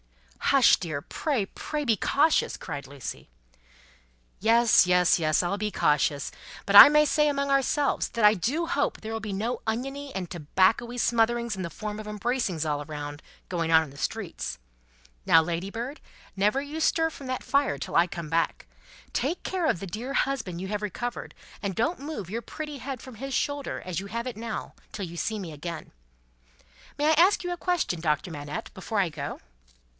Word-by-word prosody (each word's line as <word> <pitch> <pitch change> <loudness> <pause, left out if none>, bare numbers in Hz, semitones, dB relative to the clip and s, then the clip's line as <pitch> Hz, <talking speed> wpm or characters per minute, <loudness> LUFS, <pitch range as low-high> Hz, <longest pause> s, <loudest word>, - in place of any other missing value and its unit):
"Hush, 275 -3 +6
dear! 155 -5 -4
Pray, 260 - -1
pray, 295 +8 -4
be 230 -4 +3
cautious!" 290 - +2
cried 145 -4 -6
Lucie. 135 - -8 1.1
"Yes, 230 -1 +5
yes, 180 -1 +4
yes, 155 -3 +2
I'll 185 +3 -2
be 210 0 -1
cautious," 145 -3 +1
said - - -5
Miss - - -19
Pross; - - -14
"but 200 - +1
I 205 - +13
may 300 0 +5
say 300 0 +3
among 280 -1 -1
ourselves, 275 +1 +1
that 230 -3 +1
I 210 - +8
do 265 - -1
hope 285 -3 -1
there 220 +1 -6
will 225 - -3
be 210 -1 -5
no 220 +5 -2
oniony 270 +5 -3
and 180 -3 -4
tobaccoey 190 +9 +1
smotherings 235 -1 +1
in 190 - -5
the 170 - -3
form 210 +5 -6
of 215 - -10
embracings 210 - -1
all 145 0 -1
round, 145 0 -7 0.3
going 165 -2 -1
on 160 0 +6
in 145 - -10
the 140 - -14
streets. 65 - -4 0.7
Now, 165 - +7
Ladybird, 195 - -4 0.3
never 210 +7 +2
you 295 +3 -5
stir 325 0 +2
from 275 -3 -10
that 255 0 -3
fire 280 - +1
till 135 - -6
I 170 +1 +5
come 170 -3 -6
back! 165 +1 0 0.5
Take 300 +8 -1
care 365 -4 -1
of - - +1
the 195 - -6
dear 230 +9 -5
husband 240 -12 -1
you 190 - -4
have 210 +1 -3
recovered, 240 +4 -4 0.3
and 200 -3 -3
don't 300 +11 0
move 280 - -6
your 230 +4 -3
pretty 300 +4 -7
head 260 0 -5
from 260 -3 -11
his 270 +4 -6
shoulder 285 -1 -2
as 180 -3 -2
you 200 - -8
have 235 +4 -4
it 250 - -4
now, 230 +2 -5 0.2
till 200 - -4
you 170 0 -9
see 215 +5 -2
me 170 -5 -6
again! 160 +2 -7 1.1
May 295 +1 +2
I - - +6
ask 355 +4 +4
a 355 0 -1
question, 345 - -1
Doctor 155 +1 0
Manette, 145 -1 -6
before 210 +2 -3
I 190 - +3
go?" 160 - -6
215 Hz, 195 wpm, -27 LUFS, 175-275 Hz, 1.1 s, I